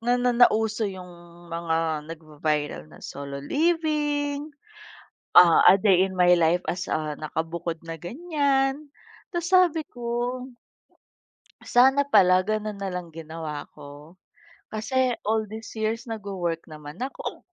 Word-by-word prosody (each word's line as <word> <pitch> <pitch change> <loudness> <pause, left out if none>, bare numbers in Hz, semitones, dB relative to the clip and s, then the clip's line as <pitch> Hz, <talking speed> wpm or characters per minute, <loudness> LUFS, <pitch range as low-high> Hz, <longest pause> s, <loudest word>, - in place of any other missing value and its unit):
na 245 +2 +2
nauso 225 -3 +3
yung 180 -2 -9 0.4
mga 160 -2 -1
nagva-viral 150 - -3
na - - -15
solo 140 0 -7
living, 295 - 0 0.9
ah, 170 -2 +7
a 180 - +9
day 190 -3 +4
in 190 - -6
my 180 -1 +5
life 170 +2 +2
as, 180 +1 -3
ah, 155 -2 -2
nakabukod 165 +1 -4
na 165 0 -7
ganyan. 280 - -1 0.4
Tas 345 +1 -2
sabi 360 -4 +4
ko 240 +1 -3 1.4
sana 265 +3 +6
pala 185 -5 +5
ganun 215 0 -3
na 195 - -2
lang 180 -3 -6
ginawa 160 -2 -7
ko. 145 +4 -13 0.6
Kasi 245 +3 0
all 220 +1 +1
these 220 +1 -8
years 220 +2 -2
nag-wo-work 195 -7 -4
naman 150 -1 -10
ako. 270 - -6
195 Hz, 125 wpm, -25 LUFS, 165-250 Hz, 1.4 s, a